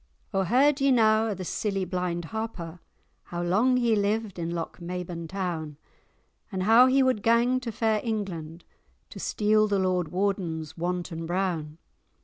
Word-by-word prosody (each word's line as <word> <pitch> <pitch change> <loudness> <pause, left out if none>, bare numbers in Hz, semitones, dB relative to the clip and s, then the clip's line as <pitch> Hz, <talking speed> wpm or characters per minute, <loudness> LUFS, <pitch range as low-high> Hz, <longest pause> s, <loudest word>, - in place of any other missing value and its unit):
"O 195 - +2
heard 270 - +3
ye 275 - +4
na 220 -3 +4
o' 210 - -2
the 185 0 -6
silly 195 0 -2
blind 180 -1 -2
Harper, 180 -5 -5 0.5
How 175 0 -4
long 220 +9 +3
he 235 -3 +2
lived 205 -1 -1
in 165 0 -2
Lochmaben 170 0 -5
town? 165 -5 -4 0.7
And 190 -2 -2
how 230 +5 +7
he 265 +1 +4
wad 255 -5 +1
gang 235 +3 +3
to 245 -2 -5
fair 220 -1 0
England, 180 -8 -4 0.5
To - - -9
steal 215 0 +2
the 200 -1 +1
Lord 185 -2 +1
Warden's 175 -4 -2
Wanton 175 -1 -3
Brown? 170 -4 -2
195 Hz, 150 wpm, -27 LUFS, 175-225 Hz, 0.7 s, how